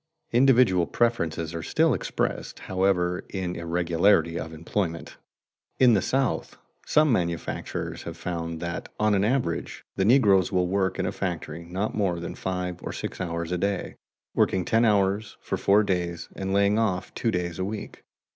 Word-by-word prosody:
Individual 120 -8 +4
preferences 85 -9 0
are 85 - -4
still - - +2
expressed, - - -2
however, 90 -2 0
in 90 -2 -3
irregularity 85 0 +2
of 80 - -6
employment. 85 +1 -3 0.6
In 125 -2 +6
the 100 - +3
South 135 -1 -1 0.3
some 150 -1 +4
manufacturers 85 -6 -2
have 85 -1 -7
found 85 -1 -4
that 85 -1 -4
on 105 0 +3
an 100 -1 +2
average 115 -6 -1
the 95 - +2
negroes 100 -5 +4
will 90 -2 +2
work 95 +1 0
in - - -1
a - - -1
factory 85 -3 -4
not 95 +5 -2
more 95 -5 0
than 85 - -5
five 90 -2 -4
or - - -5
six - - -5
hours 85 -1 -3
a 90 - 0
day, 100 0 -2 0.4
working 95 -2 +2
ten 115 +1 +3
hours 100 0 +1
for - - -3
four 105 +2 +4
days 90 -3 -2
and 95 0 -3
lying 100 +2 +3
off 95 -5 -1
two 115 - -1
days 90 -4 -2
a - - 0
week. 105 +2 -6
95 Hz, 165 wpm, -26 LUFS, 85-105 Hz, 0.6 s, In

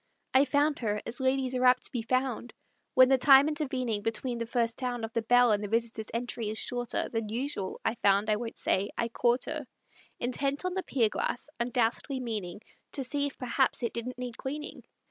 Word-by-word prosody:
I 265 +2 +6
found 290 +1 +1
her 210 -3 -1
as 235 +3 -5
ladies 260 0 +1
are 255 0 0
apt 250 0 +5
to - - -5
be 240 - -2
found, 255 0 -1 0.4
When 255 0 +8
the 265 -1 +4
time 275 +1 +7
intervening 260 -8 -1
between 225 +3 -2
the 230 - -3
first 230 -1 0
sound 245 -3 -2
Of 225 - -10
the 230 - +1
bell 245 +1 +5
and 210 0 +1
the - - -2
visitor's 225 -1 -1
entry 230 -1 -2
is 215 - -3
shorter 245 0 -1
Than 225 -2 -3
usual 230 -4 -3
I - - +2
found; 200 -2 +2
I 215 -1 +2
won't 230 0 -6
say 195 +2 +1
I 235 - 0
caught 240 +2 +1
her, 305 -4 -5 0.5
Intent 275 +5 -1
on 365 - -1
the 380 - -1
pier 250 -10 +1
glass, 245 +6 -3
undoubtedly 240 +2 0
meaning 210 -6 -4 0.3
To 275 - -1
see 285 +2 +1
if 280 - -9
perhaps 255 +1 0
it 235 - -1
didn't 240 +2 -4
need 250 -2 -6
cleaning. 295 +3 -6
245 Hz, 205 wpm, -29 LUFS, 225-265 Hz, 0.5 s, When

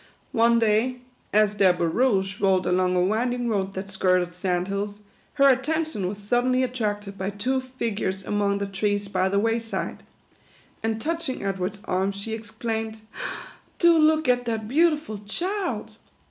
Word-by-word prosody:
One 235 -1 +4
day, 225 +3 +2 0.4
as 210 -1 +4
their 195 -3 +4
barouche 190 +3 +1
rolled 190 -2 +3
along 180 0 +2
a 180 - +3
winding 240 +5 0
road 195 -2 -1
that 190 +1 -4
skirted 185 -2 +1
San4 180 0 -1
Hills, 200 +1 -3 0.4
her 275 -1 +6
attention 275 - +1
was 200 +2 -4
suddenly 245 +5 +1
attracted 210 -5 -3
by 190 +1 -1
two 250 +6 -1
figures 220 -7 -3
among 200 -1 +1
the 200 - -2
trees 205 +1 -1
by 190 -1 +1
the 200 - +1
way 225 +3 +2
side; 225 0 -4 0.8
and 225 0 -1
touching 325 -2 -3
Edward's 195 +1 -3
arm, 190 +2 0
she 200 +3 -5
ex 225 0 -6
claimed, 220 0 -3 0.4
" - - -12 0.3
Do 340 -1 +6
look 315 -1 +4
at 245 0 +2
that 220 -2 -2
beautiful 300 -5 +2
child 360 - -3
215 Hz, 160 wpm, -25 LUFS, 195-250 Hz, 0.8 s, her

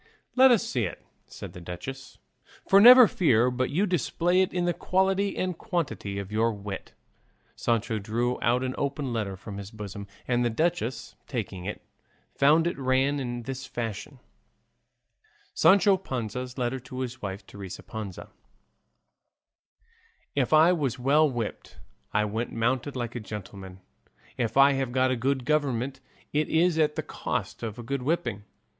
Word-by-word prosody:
"Let 260 +1 +8
us 235 -5 +4
see 120 -4 0
it," 90 - -7 0.2
said - - -9
the 90 - -10
duchess, 130 +11 -8 0.5
"for 195 +1 +7
never 250 +1 +10
fear 125 - +3
but 130 +1 -1
you 180 +9 +1
display 175 0 +1
in 185 - +2
it 175 -1 -1
the 175 - +1
quality 190 +2 +1
and 185 -1 -1
quantity 160 - -3
of 100 0 -6
your 115 +2 +2
wit." 100 -1 -7 0.6
Sancho 115 -1 0
drew 120 +4 -1
out 125 +2 +2
an 130 0 -2
open 140 -2 -2
letter 100 -4 -3
from 100 +1 -8
his 100 -1 -7
bosom, 100 -2 -8 0.2
and 120 -1 +1
the 120 - +2
duchess, 130 -2 -1
taking 90 -1 -4
it, 105 - -5 0.5
found 155 +4 +4
it 170 -4 -2
ran 135 +2 +1
in 120 -2 -4
this 135 +2 -6
fashion: 120 +4 -5 1.4
SANCHO 200 0 +5
PANZA'S 125 - -5
LETTER 125 +1 -1
TO 130 +1 -7
HIS 130 0 -5
WIFE, 95 0 -5
TERESA 95 -2 -9
PANZA 105 -4 -7 2.0
If 135 -3 0
I 160 +3 +6
was 140 -7 -1
well 145 +5 +3
whipped 120 -4 -5 0.3
I 105 0 +2
went 110 +3 -3
mounted 130 +4 -1
like 120 -2 -3
a 120 - -4
gentleman; 95 -3 -9 0.5
if 120 0 -2
I 140 +1 +7
have 135 -2 -1
got 130 +1 +2
a - - +1
good 130 +1 -1
government 135 -3 0 0.3
it 150 +1 +1
is 165 0 +2
at 150 -1 +2
the - - -2
cost - - -4
of 115 -1 -5
a 120 - -7
good 140 +3 -3
whipping. 120 - -2
130 Hz, 160 wpm, -27 LUFS, 110-150 Hz, 2.0 s, never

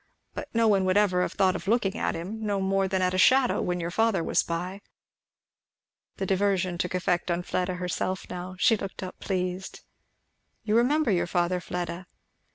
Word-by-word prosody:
But - - -6
no 230 0 +3
one 200 -3 +3
would 185 +1 +2
ever 190 -4 +3
have - - -1
thought 190 -1 +2
of 180 +1 -6
looking 210 -2 +1
at - - -1
him, 200 +7 -5
no 205 -2 0
more 195 0 +1
than 190 0 0
at 180 0 +1
a 185 - 0
shadow, 260 +4 +4
when 180 0 -1
your 170 0 -3
father 220 -3 +2
was - - +2
by." 180 +4 -4 1.4
The 195 - -2
diversion 190 -2 0
took 180 0 -1
effect 180 -1 0
on 175 +1 0
Fleda 185 +1 -1
herself 180 +1 -3
now. 180 +1 -6
She 225 +4 +4
looked 195 -2 -6
up 185 - -8
pleased. 185 0 -3 0.8
"You 215 0 0
remember 265 +3 +3
your 180 -2 +1
father, 175 0 0
Fleda?" 175 0 -5
185 Hz, 185 wpm, -27 LUFS, 180-200 Hz, 1.4 s, shadow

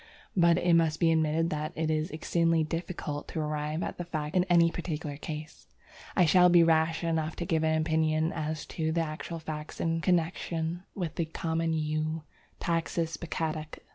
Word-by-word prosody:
But 170 -2 +5
it 175 -1 +3
must 160 -2 +3
be 165 -2 +4
admitted 160 +1 +2
that 155 0 -3
it 160 0 0
is 155 +2 0
exceedingly 165 +1 +1
difficult 155 -2 -4
to 160 - -4
arrive 150 +1 -2
at - - -5
the - - -1
facts 155 -2 -4
in 180 -1 +4
any 170 -2 +5
particular 155 -4 -4
case. 155 +1 -7 0.5
I 180 - +5
shall 180 +2 +6
be 175 -1 +7
rash 160 0 +2
enough 160 -1 0
to 175 - -4
give 160 -1 +1
an 160 0 +2
opinion 160 0 +1
as 155 0 -3
to 160 -1 0
the 165 +1 +1
actual 160 +1 -4
facts 155 -1 -6
in 165 0 0
connexion 170 -1 0
with 175 -6 -4
the 170 - +1
common 165 0 -1
Yew 155 0 -1 0.4
(Taxus 165 -1 -1
baccata). 160 -2 -3
160 Hz, 175 wpm, -29 LUFS, 155-170 Hz, 0.5 s, be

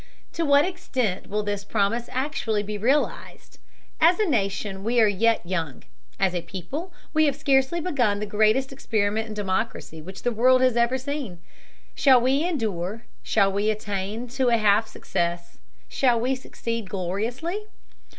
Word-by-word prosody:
To 335 - -1
what 285 +1 +5
extent 255 - -2
will 210 +1 -1
this 205 -1 -3
promise 215 +3 -1
actually 255 -6 -1
be 210 +1 -5
realized? 260 +8 -1 0.4
As 340 +2 +5
a 430 - +3
nation 200 - -1
we 235 +3 +1
are 220 - +6
yet 220 +1 +2
young, 165 -7 -3 0.4
as 190 -2 +2
a 175 - -1
people 235 - -6 0.2
we 310 0 +4
have 285 -2 +1
scarcely 275 +2 +2
begun 250 - 0
the 210 - -2
greatest 215 +6 +2
experiment 220 -4 -1
in 215 - -7
democracy 195 -4 -3
which 190 +4 -10
the 245 - +1
world 255 +3 +4
has 255 -2 +3
ever 235 +2 +2
seen. 265 -8 -5 0.6
Shall 270 -2 +5
we 265 +5 +2
endure, 220 - -2 0.2
shall 200 -2 +2
we 205 +2 0
attain 210 +2 -3
to 255 0 +1
a 235 - +4
half 215 0 +3
success, 170 -4 -3 0.3
shall 245 -4 +2
we 250 +3 +1
succeed 230 -5 -5
gloriously? 230 - -3
225 Hz, 160 wpm, -25 LUFS, 200-265 Hz, 0.6 s, are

